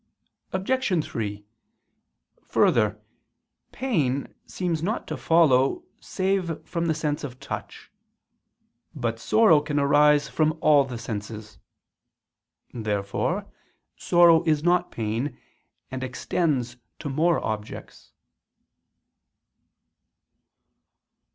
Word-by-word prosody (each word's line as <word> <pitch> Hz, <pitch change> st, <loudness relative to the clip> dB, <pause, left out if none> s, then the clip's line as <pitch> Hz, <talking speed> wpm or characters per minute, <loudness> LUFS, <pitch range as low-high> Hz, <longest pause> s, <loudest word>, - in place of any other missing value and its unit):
Obj. 190 Hz, -, 0 dB
3: 105 Hz, -2 st, -5 dB, 1.0 s
Further, -, -, +2 dB, 0.7 s
pain 150 Hz, -, -1 dB
seems 170 Hz, -4 st, -2 dB
not 210 Hz, +7 st, -2 dB
to -, -, -3 dB
follow 160 Hz, -, +3 dB, 0.2 s
save 185 Hz, -4 st, -2 dB
from 170 Hz, -1 st, -2 dB
the 160 Hz, -, +1 dB
sense 150 Hz, -1 st, -2 dB
of 130 Hz, -3 st, -7 dB
touch. -, -, -8 dB, 1.0 s
But 115 Hz, -1 st, -2 dB
sorrow 165 Hz, -, +4 dB
can 145 Hz, 0 st, -3 dB
arise 145 Hz, +1 st, +4 dB
from 155 Hz, 0 st, 0 dB
all 145 Hz, -3 st, +5 dB
the 125 Hz, -2 st, -6 dB
senses. 105 Hz, -3 st, -7 dB, 1.1 s
Therefore 105 Hz, -3 st, -2 dB, 0.5 s
sorrow 170 Hz, -2 st, +5 dB
is 155 Hz, -2 st, +1 dB
not 175 Hz, +1 st, +2 dB
pain, 115 Hz, +5 st, -3 dB, 0.5 s
and 130 Hz, 0 st, -4 dB
extends 130 Hz, -1 st, -1 dB, 0.2 s
to 155 Hz, -, -7 dB
more 160 Hz, +5 st, +2 dB
objects. 110 Hz, -1 st, -6 dB
150 Hz, 90 wpm, -25 LUFS, 120-170 Hz, 1.1 s, all